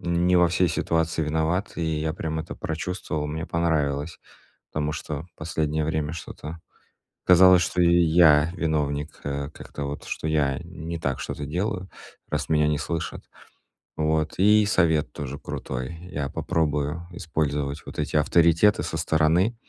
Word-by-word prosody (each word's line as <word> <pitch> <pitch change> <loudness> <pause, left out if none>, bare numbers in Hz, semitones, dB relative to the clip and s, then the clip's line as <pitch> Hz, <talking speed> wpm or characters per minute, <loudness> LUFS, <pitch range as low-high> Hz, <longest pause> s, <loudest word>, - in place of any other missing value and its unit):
не 85 +1 +2
во 90 -1 +5
всей 90 0 +2
ситуации 80 0 0
виноват, 80 +5 0
и 85 - -2 0.2
я 80 0 -1
прям 80 -1 -3
это 80 - -7
прочувствовал. 80 -2 -3
Мне 80 +2 -4
понравилось, 80 -2 0 0.5
потому 75 0 -1
что 75 0 -5
последнее 80 -1 -1
время 80 -1 -1
что-то 80 0 -8 0.7
казалось, 90 0 +7
что 90 0 -1
я 85 -2 +5
виновник, 75 -2 -2
э, 70 0 -3
как-то 75 -2 -8
вот, 70 +1 -5
что 80 - -4
я 70 -4 +1
не 85 +2 -6
так 70 -4 -2
что-то 75 - -5
делаю, 90 +4 -2 0.4
раз - - -2
меня 75 -1 +3
не 75 -1 +1
слышат. 80 0 -4 0.7
Вот, 80 0 0
и 105 +1 +5
совет 85 -7 +2
тоже 70 -1 -6
крутой. 65 +6 -5 0.2
Я 70 -1 -2
попробую 75 +2 -1
использовать 75 -5 -2
вот - - -9
эти - - 0
авторитеты 85 +6 +4
со 80 - -3
стороны. 80 +7 +2
80 Hz, 145 wpm, -25 LUFS, 75-85 Hz, 0.7 s, казалось